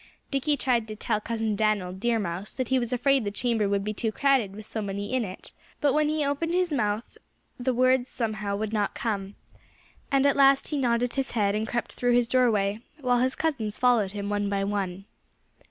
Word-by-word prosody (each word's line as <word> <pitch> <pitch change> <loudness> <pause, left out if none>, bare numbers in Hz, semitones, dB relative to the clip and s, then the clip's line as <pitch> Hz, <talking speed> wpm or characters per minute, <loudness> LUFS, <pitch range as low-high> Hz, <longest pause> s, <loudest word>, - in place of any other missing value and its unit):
Dickie 285 +1 +1
tried 240 -4 +1
to 215 - -6
tell 215 0 -1
Cousin 225 -1 -1
Dan'l 205 -4 0
Deer 230 +5 0
Mouse 190 -1 -3
that 255 -3 -2
he 260 - +3
was 240 0 -2
afraid 270 +1 +2
the 205 - -1
chamber 220 -1 0
would 200 0 0
be 210 +1 -2
too 220 +1 -1
crowded 250 -5 +2
with 215 0 -9
so 220 - -4
many 200 +2 -4
in 255 -2 +2
it. 185 -3 -8 0.3
But 285 -2 +2
when 300 0 +2
he 305 -1 0
opened 325 +5 -1
his 360 -3 +1
mouth 215 -3 -2 0.4
the 255 +1 +1
words, 255 +1 +2
somehow, 215 -4 -2
would 215 +1 -3
not 205 -2 0
come. 200 -3 -3 0.8
And 275 0 +3
at 280 - +4
last 275 -1 +4
he 300 - -1
nodded 240 -1 +1
his 270 -1 -2
head 200 -2 +2
and 215 +1 -1
crept 235 +2 -3
through 245 0 +1
his 240 -1 +3
doorway, 220 -5 +2 0.2
while 250 -3 +2
his 260 +1 +1
cousins 235 -10 -2
followed 235 -6 +3
him 200 -1 -4
one 205 0 -1
by 200 -1 0
one. 195 -2 -3
230 Hz, 210 wpm, -27 LUFS, 205-260 Hz, 0.8 s, at